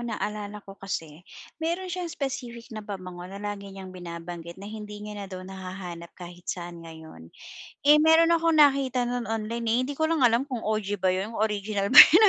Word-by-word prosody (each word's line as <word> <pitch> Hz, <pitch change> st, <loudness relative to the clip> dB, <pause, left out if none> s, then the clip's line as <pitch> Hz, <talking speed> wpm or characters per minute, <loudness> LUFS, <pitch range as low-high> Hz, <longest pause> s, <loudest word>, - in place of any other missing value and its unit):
naalala 210 Hz, -3 st, -4 dB
ko 195 Hz, -, -10 dB
kasi 165 Hz, -5 st, -5 dB, 0.4 s
meron 350 Hz, +3 st, -2 dB
siyang 355 Hz, -1 st, -3 dB
specific 240 Hz, -6 st, -5 dB
na 215 Hz, -, -5 dB
pabango 185 Hz, -4 st, -7 dB
na 195 Hz, -, -8 dB
lagi 205 Hz, -1 st, -5 dB
niyang 190 Hz, -1 st, -9 dB
binabanggit 170 Hz, -1 st, -7 dB
na 195 Hz, -, -10 dB
hindi 210 Hz, 0 st, -7 dB
niya 210 Hz, -, -6 dB
na 205 Hz, -1 st, -6 dB
daw 185 Hz, -1 st, -7 dB
nahanap 185 Hz, -2 st, -7 dB
kahit 175 Hz, 0 st, -11 dB
saan 175 Hz, -1 st, -4 dB
ngayon, 160 Hz, -, -11 dB, 0.6 s
eh, 300 Hz, -, +10 dB
meron 320 Hz, +2 st, +6 dB
akong 330 Hz, -2 st, +3 dB
nakita 265 Hz, -4 st, +4 dB
no'n 245 Hz, -1 st, -2 dB
online 225 Hz, +2 st, 0 dB
hindi 285 Hz, -, -4 dB
ko 315 Hz, -, +1 dB
lang 320 Hz, -2 st, +1 dB
alam 240 Hz, +1 st, +4 dB
kung 255 Hz, -5 st, -4 dB
OG 205 Hz, -2 st, -1 dB
ba 185 Hz, -, +3 dB
'yon 190 Hz, +5 st, 0 dB
original 210 Hz, -2 st, 0 dB
ba -, -, +1 dB
'yon 405 Hz, +6 st, +11 dB
210 Hz, 185 wpm, -27 LUFS, 185-245 Hz, 0.6 s, yon